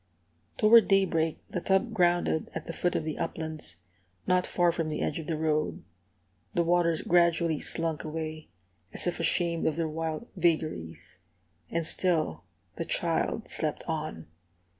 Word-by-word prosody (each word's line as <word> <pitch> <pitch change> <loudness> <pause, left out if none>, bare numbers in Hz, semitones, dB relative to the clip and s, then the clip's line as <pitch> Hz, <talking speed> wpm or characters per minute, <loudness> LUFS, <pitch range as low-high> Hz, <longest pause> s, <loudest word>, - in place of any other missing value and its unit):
Toward 225 +1 +7
daybreak 170 -5 +2
the 180 - -4
tub 195 +6 +1
grounded 175 -4 +1
at 160 - -5
the 165 - -5
foot 175 +1 -1
of - - 0
the 155 -1 -4
uplands, 160 - +1 0.5
not 180 0 +2
far 175 -1 +2
from 165 -2 -2
the 150 - -3
edge - - -1
of 160 - -7
the 160 - -1
road. 155 -1 -1 0.7
The 170 - +3
waters 170 -1 +2
gradually 170 -2 +3
slunk 165 -2 -1
away, 155 0 -5 0.5
as - - +1
if 175 - -1
ashamed 170 0 +1
of 155 - 0
their 165 -1 -1
wild 160 +7 -4
vagaries. 155 - -1 0.5
And 165 -1 -1
still 165 - 0 0.3
the - - -3
child - - 0
slept - - -1
on. 80 -1 -4
165 Hz, 150 wpm, -28 LUFS, 155-175 Hz, 0.7 s, Toward